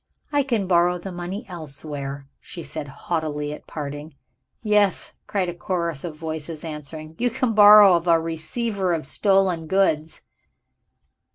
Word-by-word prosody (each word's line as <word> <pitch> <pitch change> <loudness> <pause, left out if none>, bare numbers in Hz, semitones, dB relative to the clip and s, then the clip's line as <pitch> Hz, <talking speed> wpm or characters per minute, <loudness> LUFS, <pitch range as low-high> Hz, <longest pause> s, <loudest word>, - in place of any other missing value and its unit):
"I 290 -1 +3
can 235 -7 -1
borrow 175 -1 +3
the 185 +2 -7
money 175 +3 -6
elsewhere," 145 -4 -6
she 170 - -9
said 155 -2 -6
haughtily 150 0 -3
at - - -11
parting. 145 0 -7 0.5
"Yes," 210 -3 +2 0.2
cried 190 -3 -1
a 175 - -3
chorus 170 -4 -3
of 165 -3 -5
voices, 160 0 -6
answering, 155 0 -8
"you 245 +1 +2
can 240 0 -1
borrow 210 -2 +9
of 170 +1 -2
a 165 -1 +5
receiver 180 +4 -2
of 160 -3 -2
stolen 190 -1 +1
goods." 160 -4 +1
170 Hz, 145 wpm, -23 LUFS, 155-195 Hz, 0.5 s, borrow